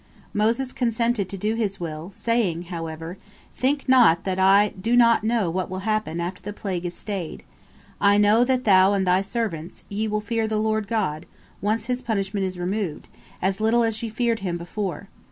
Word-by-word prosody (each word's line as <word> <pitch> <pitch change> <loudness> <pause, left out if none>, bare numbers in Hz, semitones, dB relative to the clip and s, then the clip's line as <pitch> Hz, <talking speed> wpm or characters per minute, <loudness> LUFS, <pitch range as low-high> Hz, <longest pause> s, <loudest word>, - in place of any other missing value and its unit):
Moses 230 +5 +1
consented 230 -4 0
to 195 - -4
do 210 +3 -1
his 210 -4 -2
will, 160 0 -5
saying, 200 -6 0
however: 165 +2 -6 0.3
"Think 275 +2 0
not 235 -11 +5
that 190 -1 -2
I 195 +2 +5
do 225 +6 -1
not 235 -2 +5
know 220 -6 +1
what 185 +1 -2
will 185 +1 -4
happen 215 -6 -1
after 175 +2 -4
the 205 - -6
plague 185 -4 -3
is 175 - -7
stayed. 195 -6 -5 0.6
I 205 0 +5
know 210 +3 +5
that 255 0 +1
thou 190 -1 +5
and 195 -1 +1
thy 180 +1 +3
servants, 195 -6 -4
ye 210 +2 -2
will 210 0 0
fear 220 +1 -1
the 215 0 -1
Lord 215 -1 0
God, 185 -8 -2 0.3
once 215 +2 0
His 250 +1 -2
punishment 200 -3 -1
is 185 -1 -6
removed, 180 -2 -3 0.3
as 190 +2 0
little 230 +2 +3
as 225 -1 -1
ye 230 - -3
feared 230 0 0
Him 180 -3 -2
before. 180 +1 -5
205 Hz, 190 wpm, -24 LUFS, 185-225 Hz, 0.6 s, not